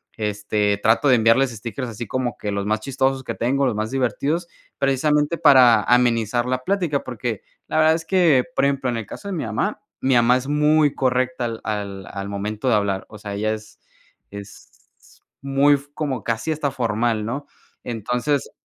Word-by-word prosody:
este, 105 -1 -1
trato 110 +7 +2
de 130 - +6
enviarles 115 +4 +4
stickers 115 +3 -6
así 115 +1 -6
como 125 +2 -3
que 105 - -4
los 100 0 -2
más 110 +1 0
chistosos 135 +1 -1
que - - -4
tengo, 135 +4 0
los 125 - +1
más 110 +1 -2
divertidos, 140 +7 -1 0.3
precisamente 150 +4 +1
para 130 -6 +6
amenizar 120 -1 +2
la 130 0 -2
plática, 175 -5 0
porque 120 -3 -4 0.3
la - - -2
verdad 160 0 +5
es 165 0 -5
que, 165 -8 +4
por 140 - +2
ejemplo, 135 -2 0
en 120 - -2
el 115 - -6
caso 200 - -9
de 200 - -3
mi 165 - -3
mamá, 110 -1 -2 0.2
mi 130 - +2
mamá 120 +1 +4
es 130 - -6
muy 150 0 +3
correcta 130 -1 0
al 115 -1 -5
al 100 -3 -4
al 100 0 -5
momento 105 +4 -3
de 120 - +4
hablar, 100 -2 -1
o 105 - -11
sea, 105 -1 -7
ella 110 +2 -1
es 105 -1 -14 0.5
es 100 0 -11 0.7
muy 140 +1 +3
f 140 +1 -8
como 135 -6 -3
casi 115 +7 -2
hasta 150 -2 -1
formal, 115 -3 -1
¿no? 140 +6 -4 0.4
Entonces 125 +5 -2
125 Hz, 185 wpm, -22 LUFS, 110-140 Hz, 0.7 s, de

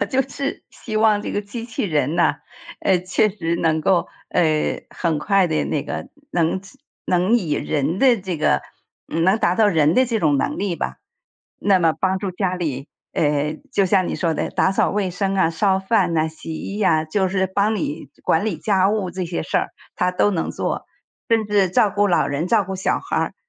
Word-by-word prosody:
我 - - +2
就 265 +6 +1
是 275 +1 -5
希 215 -2 -6
望 215 -1 +4
这 - - -4
个 205 - 0
机 225 +3 -7
器 230 -1 -4
人 150 -3 0
呢， 175 - +3 0.5
呃， 185 -2 +3
确 185 +4 +2
实 170 -4 -2
能 160 -1 +1
够， 175 +2 +2 0.2
呃， 155 -3 +1
很 165 -4 -1
快 195 +3 +2
地 155 -2 0
那 145 - -1
个 150 - -5 0.2
能 170 +2 +1 0.5
能 185 +6 +3
以 170 -10 -2
人 150 +4 -1
的 250 -6 +4
这 180 -2 -4
个 110 - +2 0.4
能 185 +6 +2
达 175 -3 +2
到 215 +2 +4
人 160 -4 +3
的 260 - +5
这 230 -2 0
种 150 -3 +3
能 - - -1
力 190 -4 -1
吧。 - - -3 0.6
那 195 -2 +4
么 165 -2 +3
帮 190 0 +1
助 190 -1 -3
家 185 0 -1
里， 145 -5 -4 0.2
诶， 150 0 0
就 195 - +2
像 185 0 +2
你 - - -2
说 165 -3 0
的， - - -2
打 190 - +2
扫 - - +2
卫 200 -3 -1
生 195 +2 -1
啊， 185 -4 +3
烧 190 +3 +2
饭 190 -3 +1
呐， 160 0 +2
洗 160 0 -8
衣 200 +6 -4
啊， 160 -5 +3
就 190 +4 0
是 190 0 0
帮 200 +3 +1
你 150 -5 -4
管 160 - +2
理 210 -7 -1
家 195 -3 +2
务 200 -4 -1
这 185 +1 -4
些 170 - -3
事 - - -1
儿 - - -2 0.3
它 180 0 +1
都 205 - +2
能 170 -5 -1
做， - - -3 0.4
甚 225 -3 +2
至 200 -3 +3
照 205 +2 +3
顾 205 0 +2
老 170 -4 +2
人， 145 +5 -2
照 220 -3 +3
顾 190 +1 -5
小 190 - 0
孩 - - -4
儿， - - -1
185 Hz, 225 characters per minute, -21 LUFS, 160-205 Hz, 0.6 s, 的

